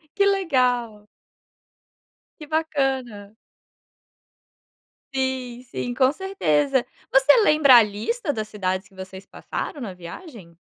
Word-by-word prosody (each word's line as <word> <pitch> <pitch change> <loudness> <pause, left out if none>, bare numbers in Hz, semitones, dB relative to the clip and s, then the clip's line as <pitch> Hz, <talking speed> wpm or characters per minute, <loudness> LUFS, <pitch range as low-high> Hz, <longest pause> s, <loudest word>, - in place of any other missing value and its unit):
Que 400 0 +3
legal. 250 - 0 1.3
Que 300 - -9
bacana. 270 -9 -2 1.8
Sim, 260 -2 -3
sim, 245 - -4
com 260 +2 +3
certeza. 295 -8 0 0.3
Você 270 +2 +5
lembra 300 -8 +6
a 235 - +8
lista 225 - -3
das 215 -4 -4
cidades 185 -1 -3
que 195 - -23
vocês 190 0 -10
passaram 295 - -6
na 205 -7 -6
viagem? 180 - -12
255 Hz, 105 wpm, -23 LUFS, 210-295 Hz, 1.8 s, a